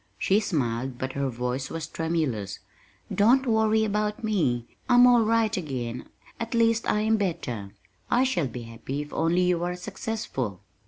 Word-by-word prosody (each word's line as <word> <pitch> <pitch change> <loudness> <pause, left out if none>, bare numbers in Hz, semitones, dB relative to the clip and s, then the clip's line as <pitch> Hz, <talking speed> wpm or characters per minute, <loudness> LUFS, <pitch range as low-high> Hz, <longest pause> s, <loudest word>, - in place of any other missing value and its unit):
She 195 +2 +3
smiled, 130 - -1
but 130 +1 -4
her 140 -1 -1
voice 125 +2 -3
was 165 -1 -4
tremulous. 155 - -2 0.6
"Don't 250 +6 +4
worry 220 -2 +3
about 210 +2 -1
me. 155 - +1 0.2
I'm 245 0 +7
all 245 -1 +6
right 225 0 +2
again 125 -8 -4 0.3
at 230 +1 -3
least 230 0 +2
I 210 - +2
am 220 +1 +3
better. 125 - -3 0.4
I 250 - +4
shall 180 - +1
be 120 0 -7
happy 120 +5 -5
if 150 - -13
only 170 +3 +2
you 180 -1 +1
are 180 0 -1
successful." 180 - -4
170 Hz, 160 wpm, -26 LUFS, -, 0.6 s, I'm